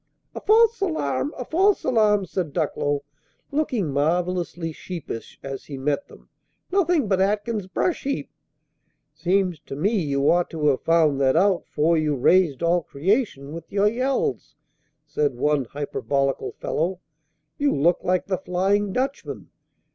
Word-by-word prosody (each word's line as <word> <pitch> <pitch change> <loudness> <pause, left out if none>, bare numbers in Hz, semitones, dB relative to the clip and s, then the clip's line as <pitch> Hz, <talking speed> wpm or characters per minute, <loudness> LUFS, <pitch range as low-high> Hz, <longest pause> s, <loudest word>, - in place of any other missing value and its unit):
"A - - -6
false 455 +1 +4
alarm! 140 - -1
a 250 - -5
false 385 - +2
alarm!" 210 -5 +3
said 175 -6 -3
Ducklow, 145 0 -1 0.5
looking 260 - 0
marvelously 170 +2 0
sheepish, 160 -8 -7
as 135 -1 -6
he 140 - -7
met 145 +6 -1
them. - - -17 0.4
"Nothing 350 - +2
but 190 -1 +2
Atkins's 205 0 0
brush 330 - -1
heap!" 280 0 -3 0.8
"Seems 180 +1 0
to 135 - -8
me 180 +9 +1
you 140 -2 0
ought 175 0 +3
to 150 -2 +1
have 135 - +1
found 160 -4 +3
that 130 -1 +3
out 190 -3 +2
'fore 160 +2 +2
you 150 -2 0
raised 165 +2 +3
all 170 +1 +3
creation 165 - -1
with 165 0 -9
your 200 +1 +3
yells!" 265 - -1 0.5
said 145 -4 -1
one 145 +1 +1
hyperbolical 140 0 -2
fellow. 175 +4 -2 0.6
"You 290 0 +2
looked 165 +5 +2
like 185 0 +1
the 185 -2 -2
Flying 195 +3 0
Dutchman! 270 +2 -3
175 Hz, 145 wpm, -24 LUFS, 145-210 Hz, 0.8 s, false